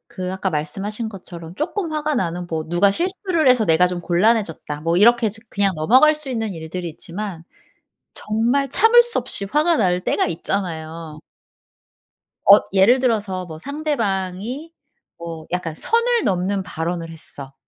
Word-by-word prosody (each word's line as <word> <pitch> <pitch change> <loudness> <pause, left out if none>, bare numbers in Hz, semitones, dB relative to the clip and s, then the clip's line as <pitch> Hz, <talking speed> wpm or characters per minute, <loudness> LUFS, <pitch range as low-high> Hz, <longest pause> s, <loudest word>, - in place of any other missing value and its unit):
그 185 0 -4
아까 190 0 -2
말씀하신 195 +9 -3
것처럼 175 -4 -10
조금 345 - -3
화가 305 -1 -1
나는 175 -4 -2
뭐 160 -2 -3
"누가 175 +4 +3
실수를 350 - 0
해서 250 -3 +5
내가 170 0 +4
좀 180 -1 -3
곤란해졌다." 175 -5 0
뭐 165 +1 +1
이렇게 235 0 +5
좀 220 +2 -12
그냥 200 -1 +1
넘어갈 255 - +5
수 305 -2 -7
있는 225 -4 -2
일들이 170 +1 -6
있지만 170 +1 -7 0.7
정말 235 +6 0
참을 450 - +6
수 475 0 -2
없이 200 - -4
화가 310 +4 +2
날 180 -5 +1
때가 - - +1
있잖아요. 165 -3 -4 1.2
엇 200 +1 +7
예를 215 +7 +5
들어서 210 -7 -1
뭐 160 -2 -9
상대방이 240 - -3 0.5
뭐 165 -2 -8
약간 175 -3 -2
선을 470 - +1
넘는 190 +1 0
발언을 165 0 -4
했어. 140 -4 -9
195 Hz, 305 characters per minute, -21 LUFS, 170-250 Hz, 1.2 s, 엇